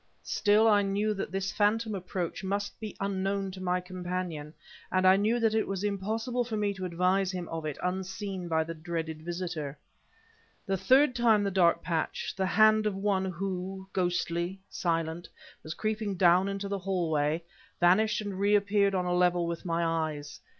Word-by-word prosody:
Still 210 +1 +3
I 205 -2 +5
knew 205 +2 0
that 195 - -4
this 195 0 -2
phantom 215 +1 +1
approach 185 -2 -4
must 200 +1 -3
be 215 -2 -6
unknown 195 0 -1
to 185 0 -9
my 180 0 +1
companion 180 -4 -5 0.4
and 185 0 +2
I 185 0 +8
knew 215 +4 +2
that 225 -2 +2
it 220 - +1
was 195 0 -3
impossible 220 +5 -1
for 230 -2 -4
me 205 -1 0
to 190 -1 -5
advise 180 +2 +1
him 180 -2 -5
of 165 -1 -4
it 150 - -4
unseen 190 0 -3
by 160 -1 +1
the 165 +1 -6
dreaded 160 -1 -4
visitor. 170 -4 -4 0.9
A 195 - +1
third 255 +9 +4
time 225 -4 +4
the 200 - 0
dark 175 -3 +3
patch 165 -2 -2
the 190 0 0
hand 215 +1 +5
of 205 - -1
one 195 -1 0
who, 190 +1 -4
ghostly, 175 0 -1
silent, 165 0 -2 0.3
was 155 +2 -6
creeping 215 -2 -2
down 180 +1 +4
into 200 0 -3
the 200 0 -2
hallway 165 -4 0 0.4
vanished 210 +5 +4
and 200 -2 -5
reappeared 200 0 +3
on 180 -1 0
a 180 - 0
level 180 -1 +3
with 170 +2 -4
my 170 -1 0
eyes. 155 -3 -2
190 Hz, 175 wpm, -29 LUFS, 175-205 Hz, 0.9 s, I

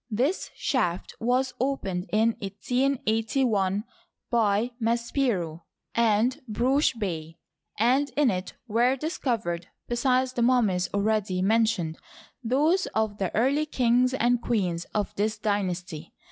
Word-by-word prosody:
This 255 - 0
shaft 190 - -1
was 250 +3 +1
opened 200 -9 -2
in 220 +2 +3
1881 220 -2 0 0.5
by 225 0 +2
Maspero 230 - 0 0.3
and 230 +2 +2
Brugsch 260 +4 +2
Bey, 165 -6 -4 0.4
and 260 +6 +3
in 290 -5 +4
it 185 0 -4
were 240 +4 +3
discovered, 230 - -2 0.2
besides 255 +1 +1
the 240 - -1
mummies 215 -8 +2
already 200 -2 0
mentioned, 215 -6 +1 0.4
those 300 +10 +2
of 220 -2 0
the 190 -3 0
early 280 +7 +2
kings 250 -1 +2
and 245 -1 +2
queens 180 -8 -1
of 210 -2 -3
this 215 +2 0
dynasty. 185 -6 -2
225 Hz, 115 wpm, -26 LUFS, 195-255 Hz, 0.5 s, in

